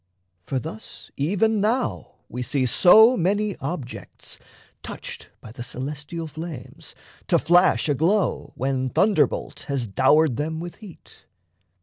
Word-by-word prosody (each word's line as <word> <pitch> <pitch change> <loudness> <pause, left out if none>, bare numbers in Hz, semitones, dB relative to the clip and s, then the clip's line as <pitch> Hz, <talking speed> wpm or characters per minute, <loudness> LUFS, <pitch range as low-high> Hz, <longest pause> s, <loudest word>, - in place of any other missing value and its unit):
For 135 - -1
thus 110 -3 -8
Even 205 +8 +1
now 235 +5 -1
we 125 - -6
see 130 +1 0
so 220 - +7
many 205 +1 0
objects, 140 -3 -6 0.4
touched - - -8
By 110 - -11
the 120 - -9
celestial 145 +6 -5
flames, 155 -3 -9 0.3
to - - +4
flash 175 +2 +3
aglow, 165 +8 +1
When 130 0 -1
thunderbolt 205 - +1
has 140 -4 -1
dowered 140 +7 +3
them 160 +2 -2
with 175 +1 -7
heat. 205 -6 -15
160 Hz, 120 wpm, -23 LUFS, 135-195 Hz, 0.4 s, so